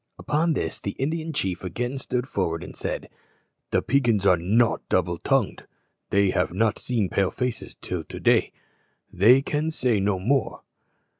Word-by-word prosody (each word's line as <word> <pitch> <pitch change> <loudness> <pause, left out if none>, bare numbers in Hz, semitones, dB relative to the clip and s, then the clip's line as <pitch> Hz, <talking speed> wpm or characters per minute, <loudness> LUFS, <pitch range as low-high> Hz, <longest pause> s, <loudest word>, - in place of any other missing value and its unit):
Upon 155 +3 +1
this 80 - -3
the 100 - -4
Indian 160 +4 -2
chief 95 - -2
again 120 +9 -3
stood 125 -1 -2
forward 85 -7 -2
and - - -10
said, - - -4 0.6
"The - - +1
Peigans 120 -7 +2
are 95 -2 +6
not 110 +8 +2
double 85 -2 +1
tongued. 135 -7 0 0.4
They 100 -1 +3
have 90 - 0
not 110 +4 +1
seen 115 -6 0
Pale 95 0 +1
faces 125 -2 -4
till - - -4
to - - -8
day. - - +3 0.6
They 120 +8 +6
can 150 +2 -1
say 125 -8 +1
no 100 0 +1
more." 125 +9 0
115 Hz, 160 wpm, -25 LUFS, 95-135 Hz, 0.6 s, are